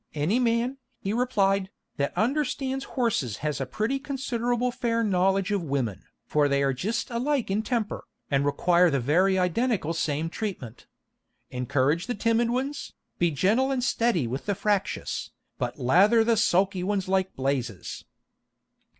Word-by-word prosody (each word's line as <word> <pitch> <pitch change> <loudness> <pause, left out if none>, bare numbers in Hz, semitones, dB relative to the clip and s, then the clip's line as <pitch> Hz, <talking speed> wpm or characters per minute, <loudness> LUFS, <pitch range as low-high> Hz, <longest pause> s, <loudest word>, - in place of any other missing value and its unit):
"Any 160 +11 +1
man," 240 +2 +1 0.2
he 195 - -3
replied, 200 -6 +1 0.3
"that 140 0 -2
understands 270 +1 0
horses 200 - -1
has 150 -2 -1
a 135 - -2
pretty 220 - -1
considerable 250 -3 -1
fair 230 -1 0
knowledge 195 0 +2
of 200 -2 +1
women, 135 - -2 0.2
for 150 -1 +2
they 140 0 +1
are 135 -1 +2
jist 215 - -2
alike 250 -1 0
in 205 +2 +1
temper, 225 -2 -2 0.3
and 140 0 +2
require 175 +5 +3
the 140 -3 +1
very 180 +9 +3
identical 180 - 0
same 160 -1 -1
treatment. 165 - -6 0.7
_Encourage 130 +6 0
the 245 - -2
timid 230 +2 +1
ones, 270 +4 -3 0.3
be 175 - +3
gentle 210 - +2
and 260 -2 0
steady 230 - +1
with 130 - -5
the 205 - +1
fractious, 205 0 -1 0.3
but 120 0 -3
lather 190 - +4
the 230 0 +3
sulky 190 -1 +2
ones 195 0 -1
like 190 0 0
blazes. 130 - -3
195 Hz, 150 wpm, -26 LUFS, 150-235 Hz, 0.7 s, lather